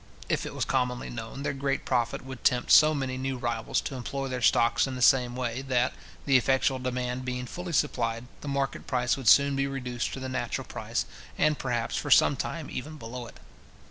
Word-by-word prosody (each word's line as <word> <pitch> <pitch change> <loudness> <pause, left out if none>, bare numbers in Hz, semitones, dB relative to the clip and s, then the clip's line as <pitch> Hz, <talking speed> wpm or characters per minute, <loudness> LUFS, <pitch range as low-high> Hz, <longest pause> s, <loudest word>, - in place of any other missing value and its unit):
If - - 0
it - - -8
was - - -1
commonly 125 -2 -1
known, 115 +4 -6
their - - -1
great 135 0 -2
profit 120 -1 0
would 130 -2 -9
tempt 125 -2 +2
so 155 0 +7
many 130 -2 -3
new 135 0 -2
rivals 120 -2 -1
to - - -5
employ 135 +2 -4
their 125 -1 -3
stocks 120 +2 +3
in 130 - -4
the 125 - -5
same 125 -1 +4
way, 125 0 -2
that, 130 -2 +1 0.3
the 135 -2 +5
effectual 130 +1 +2
demand 125 0 -3
being 125 0 -3
fully 175 +6 -6
supplied, 115 -3 0 0.2
the - - -8
market 140 -2 -2
price 125 -1 +1
would 135 -4 -6
soon 140 +4 +6
be 135 0 0
reduced 125 -3 -3
to - - -5
the 130 - -4
natural 130 -2 -3
price, - - -3 0.3
and, 150 -1 +2
perhaps, 120 -3 -1
for - - -3
some - - +6
time - - -4
even 155 +4 -6
below 120 -1 -7
it. - - -14
130 Hz, 205 wpm, -28 LUFS, 125-135 Hz, 0.3 s, so